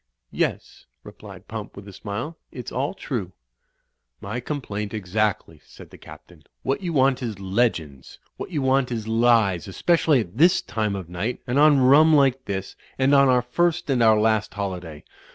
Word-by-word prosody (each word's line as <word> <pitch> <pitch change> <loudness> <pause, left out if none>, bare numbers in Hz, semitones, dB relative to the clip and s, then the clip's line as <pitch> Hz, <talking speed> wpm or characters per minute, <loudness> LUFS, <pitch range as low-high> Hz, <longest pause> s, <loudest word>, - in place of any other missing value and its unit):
"Yes," - - -3 0.2
replied - - -13
Pump - - -7
with 100 0 -11
a 100 - -11
smile, 110 - -6 0.2
"it's 125 -2 -8
all 135 +9 -2
true." 105 - -5 0.9
"My 110 +5 -5
complaint, 110 -7 -5
exactly," 105 +1 -2
said - - -15
the - - -13
Captain. 85 -3 -15 0.2
"What 135 +6 -1
you 180 -3 -3
want 135 -3 +2
is 110 -6 -5
legends. 95 - -2 0.2
What - - -7
you 150 -6 -2
want 130 -1 +1
is 110 -2 -4
lies, 110 -6 +2
especially 155 - +2
at 105 +4 -9
this 175 +4 +5
time 110 -3 -3
of 95 -4 -6
night, 95 +8 -4
and 125 +3 0
on 150 -2 +6
rum 150 +5 +6
like 135 -2 +2
this, 95 -1 -5 0.2
and 135 +1 +2
on 140 -1 +5
our 125 -1 +3
first 175 +5 0
and 125 -3 +1
our 110 -2 +5
last 110 -1 0
holiday. 90 -7 -5
120 Hz, 170 wpm, -23 LUFS, 100-135 Hz, 0.9 s, on